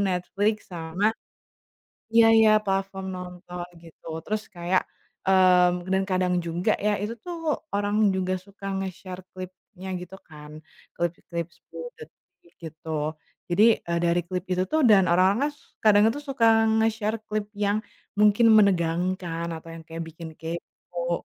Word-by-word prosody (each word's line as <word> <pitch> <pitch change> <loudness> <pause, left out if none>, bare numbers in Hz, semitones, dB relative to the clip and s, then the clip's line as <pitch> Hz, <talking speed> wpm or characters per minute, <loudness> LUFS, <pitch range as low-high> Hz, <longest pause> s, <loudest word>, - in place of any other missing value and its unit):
Netflix 200 +4 -1
sama 175 +6 0 1.0
iya 230 0 +7
iya, 220 -1 +6
platform 195 0 -2
nonton 180 -1 -7
gitu. 165 -1 -17 0.2
Terus 215 0 -2
kayak 175 +1 +1 0.4
mmm, 180 -2 +4
dan 190 0 +3
kadang 185 -1 +1
juga 170 +1 0
ya 210 - +3
itu 215 +2 -2
tuh 330 -4 -2 0.2
orang 205 +1 +2
juga 185 0 0
suka 200 0 -11
nge-share 185 -1 -6 0.2
klipnya 185 +1 -10
gitu 180 +2 -9
kan, 150 0 -11 0.4
klip-klip 170 0 -3
10 165 -1 -9
detik 170 +2 -17
gitu. 155 -1 -4 0.4
Jadi, 215 +5 +5
eee, 170 0 -1
dari 170 +1 +3
klip 180 0 -3
itu 180 0 +1
tuh 315 0 +2
dan 195 -4 +6
orang-orangnya 195 +11 +3
s - - -25 0.2
kadang 210 -1 +6
itu 290 - -5
suka 265 -5 +1 0.3
nge-share 220 0 0
klip 215 -1 -2
yang 205 0 +1 0.4
mungkin 210 +2 +5
menegangkan 175 -3 +2
atau 165 +1 -11
yang 165 - -9
kayak 165 0 -6
bikin 165 0 -9
kepo, 170 +1 -5
185 Hz, 140 wpm, -25 LUFS, 170-205 Hz, 1.0 s, iya